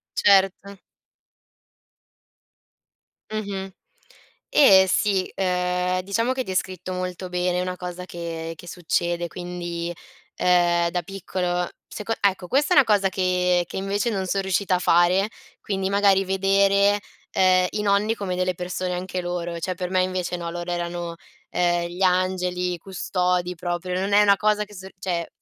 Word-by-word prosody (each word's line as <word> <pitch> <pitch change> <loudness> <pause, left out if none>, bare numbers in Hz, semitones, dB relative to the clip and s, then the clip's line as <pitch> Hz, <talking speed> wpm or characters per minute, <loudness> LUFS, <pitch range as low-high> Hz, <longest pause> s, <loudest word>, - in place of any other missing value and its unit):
Certo. 200 0 +3 2.5
Mh-mh. 200 -3 -4 0.8
Eh 190 -9 +7
sì, 195 -1 +1
ehm, 180 -1 0
diciamo 230 +6 0
che 260 - -2
hai - - -5
descritto 185 -1 -3
molto 185 0 -4
bene, 180 0 0
è - - 0
una 180 0 -3
cosa 180 0 -6
che 165 -2 -6
che 175 - -13
succede. 175 0 -1
Quindi, 175 -1 -5 0.4
ehm, 175 -1 +3
da 175 +1 -1
piccolo 180 -1 -2 0.2
seco 215 +1 -4
ecco 190 -2 +1
questa 285 - +1
è - - +4
una 275 - +7
cosa 205 -3 +3
che 180 -1 +1
che - - -6
invece 195 +3 -1
non 195 -3 -2
son 195 +2 0
riuscita 190 0 +1
a - - 0
fare, 180 +3 +3 0.3
quindi 195 -2 -2
magari 200 -1 +4
vedere, 195 +1 +3 0.3
ehm, 185 -1 +4
i 210 - -2
nonni 205 +2 +2
come 195 -4 -3
delle 185 0 0
persone 180 +1 -3
anche 180 +1 -3
loro, 175 -1 -3
cioè 185 +3 -2
per 180 0 -4
me 185 0 +2
invece 185 -1 -2
no, 170 -1 -5
loro 175 +1 -5
erano, 175 -1 -3 0.3
ehm, 175 -1 +1
gli 180 +2 -3
angeli, 180 -1 +1
i - - -5
custodi 180 -1 -1
proprio, 175 +1 -3
non 195 +2 -1
è 205 - +7
una 200 -1 +5
cosa 210 0 +1
che 210 0 -15
sor 190 0 -10
cioè, 175 -3 -2
185 Hz, 155 wpm, -24 LUFS, 175-195 Hz, 2.5 s, Eh